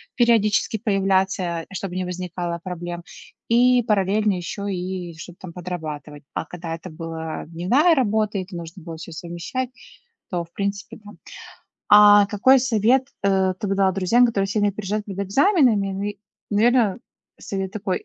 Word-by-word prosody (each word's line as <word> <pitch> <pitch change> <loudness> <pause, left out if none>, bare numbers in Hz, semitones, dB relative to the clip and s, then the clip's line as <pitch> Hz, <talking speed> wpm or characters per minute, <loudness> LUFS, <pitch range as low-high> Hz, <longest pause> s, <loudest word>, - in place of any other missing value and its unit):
периодически 225 -3 +3
появляться, 190 -5 0
а, 195 - -13
чтобы 185 -1 -4
не 185 - -1
возникало 175 -1 -4
проблем, 175 -1 -6 0.5
и 245 +1 +5
параллельно 210 -1 +1
еще 200 +3 -4
и 180 -1 -5
что-то 175 +1 -11
там 185 -3 -9
подрабатывать. 155 -5 -6
А - - -3
когда 165 0 -6
это 170 +3 -10
была 160 0 -6
дневная 205 - +3
работа, 215 -5 +1
и 185 - -2
это 185 0 -11
нужно 170 +1 -8
было 165 -1 -7
всё 170 +1 -9
совмещать, 175 +10 -4 0.6
то, 175 -2 -2
в 170 - -31
принципе, 200 0 -4
там 205 0 -13 0.7
А 205 -1 +8
какой 240 +7 +4
совет, 250 +1 +2 0.2
э, 190 -1 +2
ты 215 - -3
бы 195 - 0
дала 195 -1 +3
друзьям, 195 +6 +4
которые 210 -5 0
сильно 205 0 +1
переживают 210 +1 -3
перед 195 -2 -7
экзаменами? 240 - +3
Ну 195 - -4
и, 205 -1 -4 0.3
наверно, 225 0 +3 0.4
совет 195 -1 -4
такой: 200 -3 -3
195 Hz, 160 wpm, -22 LUFS, 175-215 Hz, 0.7 s, А